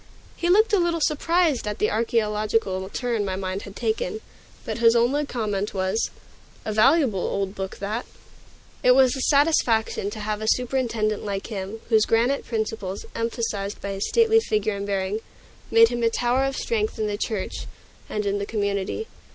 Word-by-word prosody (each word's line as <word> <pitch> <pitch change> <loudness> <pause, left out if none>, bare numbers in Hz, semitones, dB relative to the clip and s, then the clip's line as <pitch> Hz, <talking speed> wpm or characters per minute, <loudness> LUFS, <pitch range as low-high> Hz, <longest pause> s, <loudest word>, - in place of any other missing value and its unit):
He 345 - -1
looked 430 +4 +4
a 405 - +5
little 340 -1 +1
surprised 310 -3 +1
at 210 - -3
the 210 - +1
archaeological 210 -3 0
turn 235 -2 -1
my 190 -2 -2
mind 190 0 -3
had 200 - -10
taken, 220 -3 -2 0.5
but - - -4
his 230 0 +5
only 270 +5 +2
comment 210 -5 -2
was, 190 +3 0 0.6
"A 215 - -2
valuable 235 - +4
old 195 +1 -2
book 190 -1 -5
that." 215 +4 -4 0.7
It 250 0 +6
was 260 0 +5
a 265 - -3
satisfaction 255 -9 +2
to 215 - -7
have 210 0 -3
a 220 - -3
superintendent 235 -5 0
like 200 -1 -3
him, 200 +3 -5
whose 220 -2 +4
granite 240 +5 +1
principles, 215 -4 -3
emphasized 225 -3 -3
by 200 - -4
his 195 0 -2
stately 450 -1 +5
figure 215 - -1
and 200 0 -4
bearing, 195 +1 -1 0.5
made 230 0 +6
him 240 0 -3
a 230 - +3
tower 245 +3 +1
of 270 -1 -2
strength 220 -2 -1
in 220 - -1
the 210 -1 -1
church 210 -2 -3 0.4
and 210 -1 -2
in 200 0 0
the 200 - -2
community. 200 - -2
220 Hz, 175 wpm, -24 LUFS, 200-250 Hz, 0.7 s, It